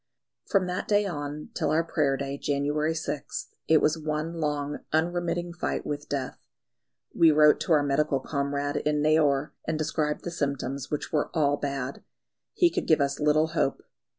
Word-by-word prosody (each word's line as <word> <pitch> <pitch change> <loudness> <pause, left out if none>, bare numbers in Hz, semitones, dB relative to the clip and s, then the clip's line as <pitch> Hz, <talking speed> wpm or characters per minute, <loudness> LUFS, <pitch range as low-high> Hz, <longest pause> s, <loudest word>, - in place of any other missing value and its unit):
From 195 -3 +2
that 180 0 -3
day 205 0 +3
on 150 -4 -5
till - - -1
our 160 +2 +2
Prayer 145 -4 +1
day, 140 0 -3
January 145 +3 0
6th, 150 -2 -4 0.2
it 160 -1 +5
was 155 +2 +2
one 155 +1 -2
long, 145 -1 -2
unremitting 175 +1 0
fight 170 - -3
with 145 0 -4
death. 135 -2 -3 0.7
We 165 - +6
wrote 150 0 +6
to 170 - +1
our 150 -2 +4
medical 140 0 +1
comrade 140 +1 -2
in 150 0 0
Neyoor, 150 -2 +3 0.2
and 160 0 0
described 150 -1 -1
the 175 - -4
symptoms, 140 -3 -3
which 150 - -3
were 150 - +1
all 145 -3 +3
bad. 140 -2 -4 0.5
He 350 -1 +4
could - - -2
give 160 - +4
us 140 0 0
little 155 +1 +3
hope. 160 -4 -1
150 Hz, 170 wpm, -27 LUFS, 140-160 Hz, 0.7 s, We